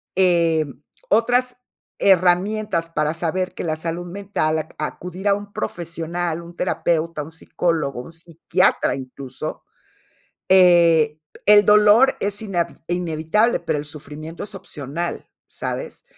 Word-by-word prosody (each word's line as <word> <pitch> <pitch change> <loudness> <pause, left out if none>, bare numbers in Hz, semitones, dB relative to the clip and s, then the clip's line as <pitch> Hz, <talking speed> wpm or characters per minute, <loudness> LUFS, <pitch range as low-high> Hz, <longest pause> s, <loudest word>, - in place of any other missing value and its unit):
eh, 170 -4 +3 0.4
otras 245 +3 +2 0.4
herramientas 185 -1 +2
para 150 -2 0
saber 180 +2 -2
que - - -6
la 160 -2 -1
salud 165 +2 -4
mental 195 -5 -1
ac - - -8
acudir 180 +5 -5
a 200 - +4
un 205 0 -9
profesional, 170 0 -3
un 170 0 -12
terapeuta, 165 -3 -1
un 160 - -11
psicólogo, 160 -5 -2
un 160 - -12
psiquiatra 170 +2 0
incluso, 130 0 -7 0.9
eh, 170 -5 +5 0.3
el 210 0 +7
dolor 210 +5 +6
es 205 +1 -2
inavi 175 -5 -2
inevitable, 175 +6 +1
pero - - -1
el 145 - -5
sufrimiento 155 +2 -8
es 205 - -8
opcional, 170 -2 -5 0.2
¿sabes? - - -6
170 Hz, 120 wpm, -21 LUFS, 160-195 Hz, 0.9 s, el